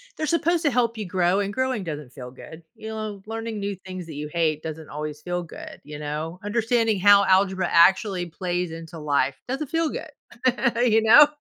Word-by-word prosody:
they're 310 - -2
supposed 335 +1 +1
to 290 - +4
help 235 -1 +1
you 215 - -4
grow, 180 +1 +1
and 200 0 -2
growing 260 -5 -1
doesn't 150 -6 -6
feel 125 -2 -9
good, 160 +5 -12
you 220 - -8
know, 215 -2 -5
learning 225 -1 -5
new 200 0 -3
things 185 -1 -8
that 160 - -9
you 150 +1 -5
hate 155 -3 0
doesn't 160 -1 -7
always 150 0 -6
feel 175 0 -2
good, 165 - -10
you 150 +1 -8
know, 150 +4 -5
understanding 225 -1 +1
how 200 +1 +6
algebra 190 -1 +3
actually 190 +1 +4
plays 175 0 -3
into 165 0 -9
life 140 -3 0
doesn't 270 +4 -3
feel 325 +2 0
good, 310 - -6 0.7
you 225 -2 +4
know, 235 +7 +8
190 Hz, 195 wpm, -24 LUFS, 160-225 Hz, 0.7 s, know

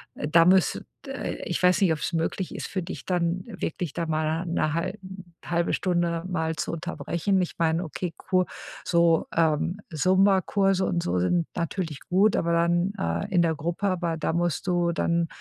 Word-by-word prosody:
da 165 +3 +4
müsst 185 0 +3 0.2
äh, 270 0 -4
ich 175 - -2
weiß 180 -1 +5
nicht, 180 -4 +4
ob's 155 - -3
möglich 165 +3 -2
ist - - -4
für 185 -2 -3
dich 155 - -7
dann 180 0 0
wirklich 180 - -4
da 170 - -2
mal 160 +2 -1
'ne 155 -2 0
hal 170 +5 -2 0.5
halbe 170 0 0
Stunde 175 -2 0
mal 160 -3 -1
zu - - -3
unterbrechen. 170 +3 -1
Ich 180 - -3
meine, 165 0 +2
okay, 170 +2 -4
Ku 185 -1 +1 0.4
so, 170 -1 +3
ähm, 165 +4 +1
Zumba-Kurse 190 +2 +3
und 175 -2 0
so 90 +1 0
sind 165 - +1
natürlich 170 -3 -3
gut, 195 +4 +4
aber 170 0 0
dann, 175 +2 +2
äh, 85 0 -1
in 175 - +5
der 165 -1 +1
Gruppe, 170 +6 -2
aber 170 -3 -1
da 160 - -1
musst 175 +1 -1
du 175 -1 +2
dann 170 0 +1
170 Hz, 175 wpm, -26 LUFS, 165-185 Hz, 0.5 s, weiß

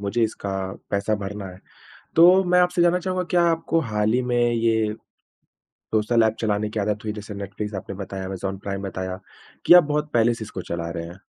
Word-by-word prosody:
मुझे 100 +4 -1
इसका 105 -3 -2 0.4
पैसा 100 +2 0
भरना 100 0 -5
है। 90 +1 -14 0.6
तो 180 +3 +7
मैं 180 0 +4
आपसे 180 -1 +2
जानना 175 +1 +4
चाहूँगा 185 0 -2
क्या 175 -1 +4
आपको 165 0 0
हाल 105 +1 +1
ही 125 - +2
में 120 - +2
ये 110 -2 +1 1.0
सोशल 110 +2 +3
एप 110 0 +1
चलाने 105 -1 0
की 110 - -3
आदत 105 +1 -1
हुई 105 - -2
जैसे 105 0 -8
नेटफलिक्स 100 +1 -6
आपने 95 +1 -6
बताया, 95 0 -6
अमेज़न 95 +1 -4
प्राइम 100 0 -5
बताया 95 -1 -4 0.5
कि - - +8
आप 180 -2 +9
बहुत 150 +1 -2
पहले 120 0 +4
से 115 - -6
इसको 95 -3 -7
चला 85 -1 -4
रहे 85 0 -5
हैं। 90 +3 -12
105 Hz, 200 wpm, -23 LUFS, 100-130 Hz, 1.0 s, आप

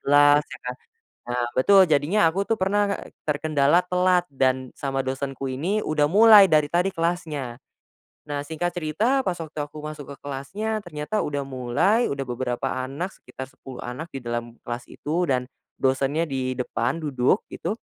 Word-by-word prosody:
belas, 145 +1 +6
ya - - -10
kan? 125 0 -4 0.5
Nah, 120 0 -1
betul, 190 +5 +6
jadinya 160 +4 +3
aku 195 +4 -2
tuh 225 - +2
pernah 205 0 +1 0.2
e - - -11 0.2
terkendala 150 +2 +3
telat 180 0 +2
dan 130 -1 0
sama 135 -1 -1
dosenku 135 0 -3
ini 165 +11 -1
udah 150 -1 +2
mulai 205 +3 +8
dari 155 -3 +3
tadi 180 +3 +2
kelasnya. 160 -7 -2 0.6
Nah, 145 -1 -4
singkat 160 +3 -2
cerita, 215 - +1
pas 185 - +1
waktu 160 -3 -9
aku 150 +1 -10
masuk 150 -1 -7
ke - - -11
kelasnya, 160 +11 -3
ternyata 165 +6 -2
udah 145 -1 -2
mulai, 135 - +1
udah 140 -1 -2
beberapa 125 -1 -3 0.2
anak 145 +8 -4
sekitar 130 0 -9
10 130 -1 -11
anak 140 +7 -7
di 135 - -5
dalam 120 0 -4
kelas 120 0 -5
itu 170 +4 -1
dan 125 -4 -1 0.3
dosennya 140 +4 +1
di 130 -1 -1
depan, 130 +6 -2
duduk, 140 - +1
gitu. - - -3
150 Hz, 165 wpm, -24 LUFS, 130-175 Hz, 0.6 s, mulai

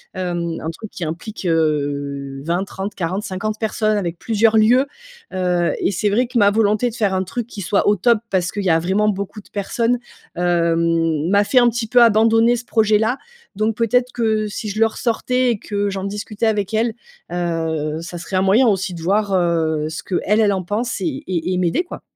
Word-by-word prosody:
Hem, 175 -2 -2
un 160 - -3
truc 210 +6 -9
qui 180 - -6
implique, 175 +7 -6
heu, 140 -4 -1
20-30-40-50 190 +3 -3
personnes, 215 -1 0
avec 175 -4 -3
plusieurs 225 +2 +2
lieux, 240 +5 +5 0.5
heu, 180 -2 +1
et - - +1
c'est 205 +2 0
vrai 235 +5 +1
que 250 0 -3
ma 205 -2 +5
volonté 215 +2 +2
de 230 - -10
faire 205 -5 0
un 185 0 0
truc 235 +5 -4
qui 220 - -10
soit 195 +2 +1
au 205 - +3
top, 230 +4 +3
parce 180 -2 0
qu'il 205 - -3
y 190 - +1
a 165 -1 +4
vraiment 195 +5 +1
beaucoup 200 +1 -4
de - - -24
personnes, 230 +4 -1 0.4
hem, 165 -2 +1
m'a 200 +1 +4
fait 255 +5 +3
un 240 - +5
petit 235 0 -3
peu 245 +2 +5
abandonner 225 +1 +5
ce 240 - -5
projet-là. 220 +2 +2 0.4
Donc, 215 +2 0
peut-être 245 +2 +1
que 220 -2 0
si 210 +1 -5
je 210 +2 -4
le 225 - +6
ressortais 250 +3 0
et 230 - -1
que 205 -1 -2
j'en 190 -1 -4
discutais 210 +2 -3
avec 210 -1 -1
elle, 225 +1 +1 0.4
heu, 165 -3 -2
ça 175 +1 -7
serait 185 - -6
un 185 - +2
moyen 215 +7 +4
aussi 195 -3 0
de 170 - -8
voir, 200 +3 +1
heu, 165 -4 +1
ce 160 - -6
qu'elle, 205 +3 0
elle, 205 -2 +3
en 190 - -1
pense 220 +7 -2
et 295 -3 -3
et 180 0 -1
et - - 0
m'aider, 180 - +1
quoi. 355 - -9
200 Hz, 205 wpm, -20 LUFS, 175-220 Hz, 0.5 s, le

